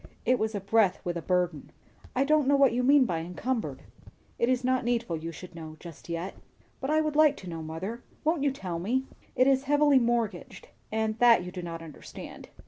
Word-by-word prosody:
It 255 0 +3
was 220 0 -1
a - - -1
breath 200 0 +2
with 175 -1 -2
a 170 - -3
burden. 180 -5 -1 0.5
"I 260 - +3
don't 300 -1 +3
know 285 - +5
what 275 -3 +5
you 245 - +1
mean 275 +1 +5
by 170 -7 -1
'encumbered.'" 200 +9 -3 0.6
"It 235 - +2
is 255 0 +1
not 255 0 +1
needful 235 -7 0
you 165 +1 -5
should 180 +2 -11
know, 160 -2 -9
just 170 -1 -12
yet." 170 +3 -3 0.5
"But 265 - -3
I 310 +1 +3
should 305 -1 -2
like 305 -2 +5
to 185 - -10
know, 165 -2 -5
mother. 175 +9 -5 0.2
Won't 320 -1 +1
you 285 - +3
tell 180 -10 -5
me?" 250 +9 0 0.3
"It 255 - +4
is 270 0 +3
heavily 290 -1 +4
mortgaged. 230 -6 -2 0.2
And 220 0 -1
that 235 -6 +6
you 180 - -7
do 180 - -6
not 165 -1 -6
understand. 155 -3 -10
225 Hz, 215 wpm, -28 LUFS, 175-260 Hz, 0.6 s, that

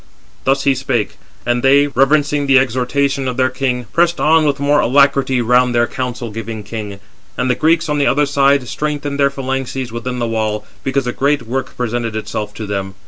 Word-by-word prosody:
Thus 135 +1 +2
he 140 - +3
spake; 130 -4 -2 0.3
and 120 0 +1
they, 140 +2 +5
reverencing 145 +1 +1
the 135 -1 +5
exhortation 135 +2 0
of 125 - -3
their 130 0 +2
king, 125 -2 -2
pressed 170 0 +2
on 160 0 +4
with 145 -1 0
more 145 +1 +2
alacrity 135 -1 +3
round 125 +1 +3
their 120 0 +3
counsel 125 -2 -5
giving 110 0 -6
king. 105 -2 -7 0.4
And 125 0 +1
the - - +3
Greeks, 160 +6 +1
on 150 -1 0
the 140 - +2
other 145 +1 +3
side, 140 -2 +2
strengthened 145 0 -3
their 140 0 +4
phalanxes 135 -2 -4
within 125 +2 -4
the 120 - -1
wall, 110 -2 -2 0.2
because 135 0 -1
a 125 - -2
great 140 -1 0
work 130 +3 -4
presented 120 -2 -2
itself 105 -1 -4
to 110 - -5
them. 95 -1 -4
130 Hz, 195 wpm, -17 LUFS, 120-140 Hz, 0.4 s, they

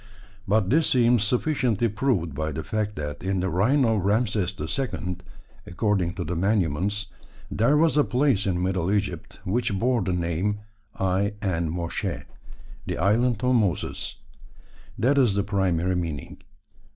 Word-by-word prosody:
But 100 0 +2
this 160 +3 +3
seems 120 -2 +4
sufficiently 120 -2 +1
proved 105 - 0
by 80 +2 -2
the 80 +2 -4
fact 105 +3 -2
that 75 -1 -5
in 95 0 -1
the 95 +1 -1
reign 125 - +3
of 110 -5 +1
Rameses 105 -2 +1
II., 90 -9 -3 0.5
according 90 -2 0
to 90 - -3
the 85 +3 -3
monuments, 100 +1 0 0.5
there 120 +8 +3
was 160 0 +3
a 150 - +6
place 125 -7 +2
in 90 -1 0
Middle 95 -1 0
Egypt 105 -1 -2
which 110 +1 0
bore 120 +2 +1
the 95 0 -1
name 90 +4 -1 0.3
I 95 +2 0
en 85 -4 0
Moshe, 85 +1 -3 0.6
"the - - -2
island 110 +5 +2
of 125 0 +3
Moses." 100 -5 0 0.8
That 140 +4 +3
is 120 -7 +3
the 100 - +1
primary 95 -3 0
meaning. 80 -5 -4
100 Hz, 150 wpm, -25 LUFS, 90-115 Hz, 0.8 s, a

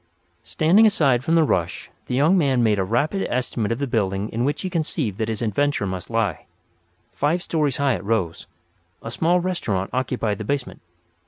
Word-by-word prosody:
Standing 190 +8 +4
aside 135 - +2
from 165 +4 +1
the 165 - +5
rush, 85 - -1 0.2
the 125 - -2
young 150 +8 +4
man 135 -8 +2
made 105 -3 +2
a - - +2
rapid 140 - 0
estimate 120 -3 -1
of 115 - 0
the 140 - -1
building 100 -4 -1
in 115 +2 -2
which 145 +3 -1
he - - -1
conceived 150 - -2
that 110 0 -1
his 110 0 -2
adventure 115 +2 0
must 95 -1 -5
lie. 115 -6 -1 0.7
Five 160 +5 0
stories 150 -5 0
high 140 -2 +2
it 95 - -4
rose. 100 -6 -2 0.6
A - - -5
small 175 +2 +2
restaurant 110 - -2
occupied 125 -5 -1
the - - -4
basement. 140 +3 -3
125 Hz, 185 wpm, -22 LUFS, 105-150 Hz, 0.7 s, the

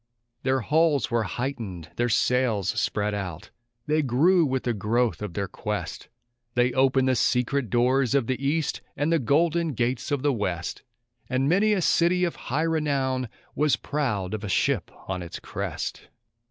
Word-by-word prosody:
Their 130 0 +1
hulls 150 0 +2
were 115 0 +2
heightened, 110 - -4
their 120 0 +1
sails 115 -5 +2
spread 105 -2 0
out. 95 -2 -5 0.3
they 155 +1 +2
grew 155 +6 +4
with 130 -1 -1
the 120 - 0
growth 110 -1 0
of 105 -5 -5
their 100 -1 -1
quest; - - -5 0.5
They 120 0 +3
opened 130 0 +3
the 130 - +3
secret 125 +1 +1
doors 125 +3 +2
of 135 -4 +3
the 130 +3 -2
East, 150 +3 0 0.2
and 150 +3 +1
the 165 - +3
golden 160 +5 +2
gates 120 +1 -1
of 145 -2 -1
the 145 -1 +3
West; 90 -6 -3 0.5
And 130 +1 +1
many 200 +7 +4
a 190 -4 +1
city 175 +3 +3
of 175 - 0
high 145 +6 +1
renown 140 -6 0 0.2
was 150 0 +2
proud 105 -10 -2
of 110 -1 -4
a 105 - -4
ship - - +1 0.2
on 95 -1 -3
its 85 -1 -6
crest. - - -5
130 Hz, 165 wpm, -26 LUFS, 110-145 Hz, 0.5 s, grew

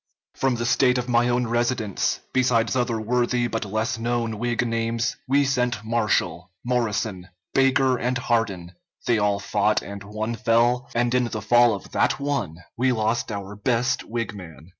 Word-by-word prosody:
From 135 -2 0
the 120 0 -3
State 125 0 +3
of 125 0 -2
my 120 0 +3
own 120 0 +1
residence, 120 -3 -1
besides 125 -2 +2
other 120 -3 0
worthy 120 +2 +1
but 115 -2 -2
less 110 +3 -2
known 115 -2 -1
Whig 120 0 0
names, 115 +1 -1
we 140 +2 +3
sent 125 -4 0
Marshall, 100 -6 0 0.2
Morrison, 110 -6 -1 0.3
Baker, 135 -1 +3
and 125 +1 0
Hardin; 110 -8 -1 0.3
they 115 -2 +2
all 105 -1 +2
fought, 105 +1 +1
and 100 0 -8
one 110 +3 -4
fell, 120 +1 +2
and 120 +1 +1
in 125 -1 +3
the 110 -2 -4
fall 120 +2 +4
of 95 - -10
that - - +1
one 140 - -2 0.2
we 130 +2 +2
lost 115 0 0
our 100 0 -6
best 120 +4 0
Whig 115 -1 -4
man. 80 -5 -11
115 Hz, 165 wpm, -24 LUFS, 105-125 Hz, 0.3 s, fall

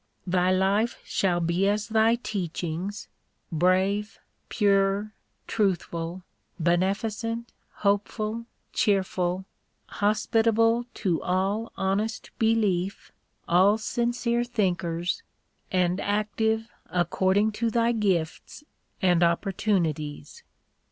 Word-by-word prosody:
Thy 180 0 +2
life 195 +5 +2
shall 180 -3 +1
be 170 +3 +1
as 210 +2 0
thy 225 +1 +4
teachings, 185 -2 -4 0.4
brave, 190 +5 +1 0.3
pure, 200 0 +2 0.3
truthful, 180 -4 -1 0.4
beneficent, 215 +7 0 0.3
hopeful, 215 +3 0 0.3
cheerful, 190 -2 +1 0.4
hospitable 225 +2 +2
to 180 -6 0
all 195 +5 -1
honest 205 +4 -1
belief, 205 -5 +1 0.4
all 190 +5 +5
sincere 235 +1 0
thinkers, 180 - -1 0.5
and 180 0 +1
active 220 +2 0 0.2
according 190 +4 +2
to 230 +2 -1
thy 230 +1 +2
gifts 195 - -1 0.4
and 175 -2 +4
oppor 170 +3 +2
tunities. 155 -9 -1
200 Hz, 85 wpm, -26 LUFS, 180-220 Hz, 0.5 s, all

